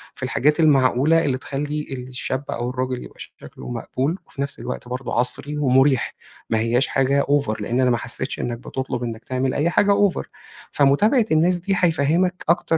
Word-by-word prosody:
في - - -7
الحاجات 150 +4 +1
المعقولة 150 +1 +4
اللي 130 -3 0
تخلّي 150 +3 -4 0.2
الشاب، 130 +1 -3
أو 120 +1 -3
الراجل 125 0 -3
يبقى - - -14
شكله - - -11
مقبول، 130 +7 -2
وفي 140 - -7
نفس 140 0 -3
الوقت 125 -1 -6
برضه 125 +1 -5
عَصري، 140 +4 0
ومُريح. 135 -2 +2 0.3
ما 110 - +1
هيّاش 120 +4 +1
حاجة 135 +1 +2
over. 140 -7 0
لإن 120 +5 0
أنا 130 - +3
ما 120 - +2
حسّيتش - - -5
إنّك 120 -1 -3
بتطلب 130 0 -4
إنّك 115 -1 -5
تعمل 130 0 -1
أي 155 +4 +1
حاجة 205 +3 +3 0.2
over. - - -5 0.5
فمتابعة 205 - +3
الناس 175 +3 +3
دي، 195 +3 -1
هيفهّمك 175 +2 +1
أكتر 165 -1 +2
135 Hz, 175 wpm, -22 LUFS, 125-155 Hz, 0.5 s, المعقولة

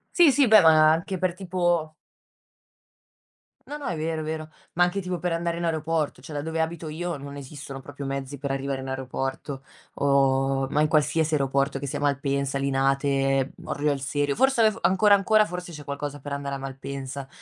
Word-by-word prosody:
Sì, 340 -5 +7
sì, 270 -1 +4
beh, 215 -2 +8
ma 155 -1 +6
anche 170 +4 -1
per 185 -2 0
tipo 175 -4 0 1.7
No, 295 - -6
no, 295 -1 -7
è 175 - -2
vero, 160 0 -2
è - - -5
vero, 155 0 -4 0.3
ma 175 - +5
anche 195 +3 -2
tipo 180 -2 -3
per 180 0 -1
andare 170 0 -1
in 170 - -2
aeroporto, 160 -4 -1
cioè 150 +1 -7
da - - -1
dove 160 +1 -2
abito 160 0 -3
io 170 +1 -4
non 140 +1 -9
esistono 140 -1 -8
proprio 145 0 -8
mezzi 135 +1 -4
per 140 +1 -4
arrivare 135 0 -2
in 135 - -6
aeroporto 135 +1 -4 0.3
o 135 -1 +2
ma 150 - 0
in 155 - +4
qualsiasi 155 +1 +2
aeroporto 140 0 +1
che 140 - -5
sia 140 +1 -3
Malpensa, 140 -1 0
Linate, 135 0 +1
uhm, - - -13
Orio 145 +1 0
al 140 - -2
Serio, 145 +1 -1
forse 265 -2 +3
af 215 -2 +3
ancora, 200 +2 +5
ancora, 215 +2 +4
forse 180 -2 -7
c'è 150 -1 -8
qualcosa 145 0 -5
per 145 +1 -7
andare 140 0 -3
a - - -4
Malpensa, 135 0 -6
145 Hz, 195 wpm, -25 LUFS, 135-170 Hz, 1.7 s, beh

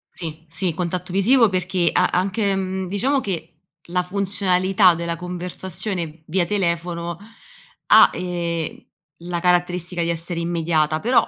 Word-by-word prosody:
Sì, 160 -2 -6
sì, 165 +1 -2
contatto 180 +1 -3
visivo, 225 +4 +4
perché 185 -2 0
a - - +3
anche, 195 +2 +1
mhmm, 190 0 -3
diciamo 225 +10 0
che 170 -8 -4 0.3
la 180 +1 0
funzionalità 190 0 +3
della 170 0 -3
conversazione 180 -1 -5
via 175 +2 +1
telefono 170 -2 -1 0.7
ha, - - +8
ehm, 170 -2 -3 0.4
la 175 0 -3
caratteristica 175 0 +1
di 170 - -1
essere 170 +1 -2
immediata, 160 -2 0
però 240 +6 +3
180 Hz, 130 wpm, -21 LUFS, 170-190 Hz, 0.7 s, ha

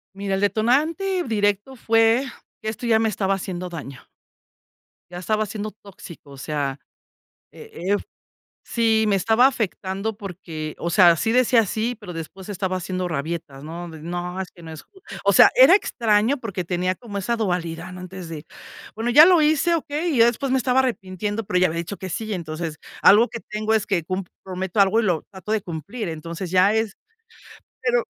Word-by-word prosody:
Mira, 195 0 -2
el 190 - -2
detonante 300 - +1
directo 205 - 0
fue 225 +3 +3 0.4
que - - -7
esto 235 +3 -6
ya 225 -2 +4
me 225 - +2
estaba 195 -1 0
haciendo 180 -1 -5
daño. 145 -6 -8 1.1
Ya 175 - -7
estaba 215 +4 0
siendo 210 +1 -5
tóxico. 190 -7 -13
O 140 - -11
sea, 140 -1 -3 0.7
eh - - -13 0.2
eh - - +4 0.7
sí, 225 -2 +2
me 200 - +3
estaba 225 +6 +4
afectando 210 -4 -2
porque, 170 -6 -7
o 170 - -3
sea, 175 -1 +6
sí 225 +7 0
decía 245 -2 +4
sí, 225 +5 -2
pero 205 -6 -9
después 175 +4 -8
estaba 190 -2 -2
haciendo 185 0 -3
rabietas, 155 -3 -4
¿no? 170 +3 -7
De 160 -1 -11
no, 175 +2 -4
es 190 - -5
que 175 - -16
no 165 - -9
es 155 - -9
ju 385 - -22 0.2
O - - +4
sea, - - +8
era - - +8
extraño, 230 - +1
porque 200 -7 -4
tenía 180 +1 -1
como 205 -2 -7
esa 235 +5 -1
dualidad, 175 -4 -3
¿no? 180 - -9
Antes 180 -1 -8
de 155 -2 -7 0.5
bueno, 225 +2 -1
ya 295 +6 +9
lo 360 -2 +6
hice, 315 +3 +3
¿okey? 315 +1 -2
Y - - +1
ya 230 - +7
después 245 +3 -1
me 265 - +3
estaba 255 +1 +2
arrepintiendo, 210 -3 -2
pero 190 -2 0
ya 185 - +5
había 165 +1 -4
dicho 170 +4 -4
que 190 - -7
sí. 215 +5 -4
Entonces, 160 -3 -4 0.2
algo 220 +4 +7
que 230 +1 -7
tengo 215 +1 -2
es 215 -2 +1
que 180 -5 0
cum 185 +3 -3 0.2
prometo 185 +1 -4
algo 200 +3 +4
y - - -1
lo 175 -6 +1
trato 190 +2 -9
de 220 -2 +1
cumplir. 185 - -5
Entonces, 165 +2 -6
ya 185 +3 +4
es 220 -2 0 0.9
pero 480 0 +2
200 Hz, 190 wpm, -23 LUFS, 175-225 Hz, 1.1 s, ya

